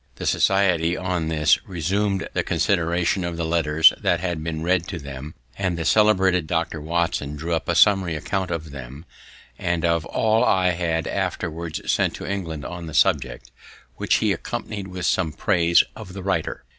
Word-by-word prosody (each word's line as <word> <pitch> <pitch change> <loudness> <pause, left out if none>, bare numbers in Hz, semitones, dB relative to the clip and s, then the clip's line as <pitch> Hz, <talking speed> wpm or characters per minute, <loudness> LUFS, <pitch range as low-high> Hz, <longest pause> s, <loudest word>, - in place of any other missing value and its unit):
The - - -6
society, 90 -3 +2
on 90 -3 -2
this, 75 -1 +3
resum'd 95 +3 -1
the - - +1
consideration 85 +1 0
of 85 -1 -4
the 85 - -2
letters 80 -1 +4
that - - +2
had 85 -4 -3
been 80 -1 -4
read 90 0 +1
to - - -5
them; 70 +2 -8 0.2
and 95 -3 -1
the 80 - -3
celebrated 95 -5 +3
Dr. 80 -2 -2
Watson 80 -3 -1
drew 80 +3 -3
up 80 - -2
a 85 - +1
summary 95 -3 +4
account 95 +4 -2
of 80 -3 -4
them, 70 +3 -9 0.5
and 85 -2 -1
of 85 -1 +1
all 110 +1 +1
I 95 -6 +3
had 85 -2 -1
afterwards 80 0 -3
sent - - +1
to - - -7
England 80 -7 -4
on 85 -1 -6
the 80 - -7
subject, - - +1 0.5
which - - +1
he - - +2
accompanied 100 -2 -5
with 90 -1 -5
some 80 -3 +1
praise 85 -3 +3
of 100 -4 -10
the 95 -1 -7
writer. 95 -4 -2
85 Hz, 175 wpm, -23 LUFS, 80-95 Hz, 0.5 s, letters